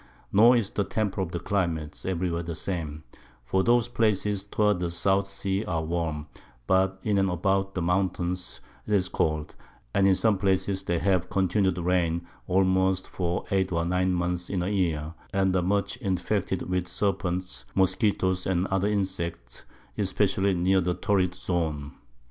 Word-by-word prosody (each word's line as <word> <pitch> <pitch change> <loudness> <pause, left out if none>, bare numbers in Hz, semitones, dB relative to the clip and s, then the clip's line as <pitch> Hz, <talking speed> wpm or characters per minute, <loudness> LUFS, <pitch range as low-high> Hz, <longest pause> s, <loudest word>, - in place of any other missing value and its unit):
Nor 115 +5 +7
is 105 -4 -1
the 100 - 0
Temper 100 -2 -2
of 90 -3 -3
the 85 - -2
Climate 85 -7 -2
every 90 -1 -1
where 85 0 -1
the 85 -1 -5
same, 80 -5 -4 0.4
for 95 +8 +1
those 120 +1 +3
Places 105 -4 +1
towards 105 -1 +1
the 90 -1 -1
South 95 +3 +1
Sea 100 +1 -2
are 80 -3 -1
warm, 80 -2 -2 0.4
but 95 +2 +2
in 105 -2 +2
and 95 0 +2
about 95 +2 0
the 90 - -1
Mountains 90 0 -1 0.3
'tis 100 -3 +2
cold; 75 -3 -1 0.4
and 95 0 +4
in 95 - +5
some 105 -1 +2
places 95 0 +1
they 85 - 0
have 90 -1 +1
continu'd 95 -1 +1
Rains 85 -1 +1 0.2
almost 95 0 +2
for 90 -1 -2
8 95 -1 +1
or 85 -1 0
9 90 +1 +1
months 90 0 -1
in 90 -3 -1
a 90 - -1
Year, 85 -6 -1 0.2
and 95 -1 +2
are 90 - +3
much 100 +5 0
infected 95 -3 -1
with 90 -1 -1
Serpents, 90 -1 -2
Moskitto's, 95 -1 +1
and 95 -1 +1
other 95 +1 +1
Insects, 90 -10 -3 0.3
especially 95 0 +1
near 95 +2 +3
the 90 0 0
Torrid 90 -3 +1
Zone. 80 -6 -2
95 Hz, 160 wpm, -27 LUFS, 85-95 Hz, 0.4 s, Nor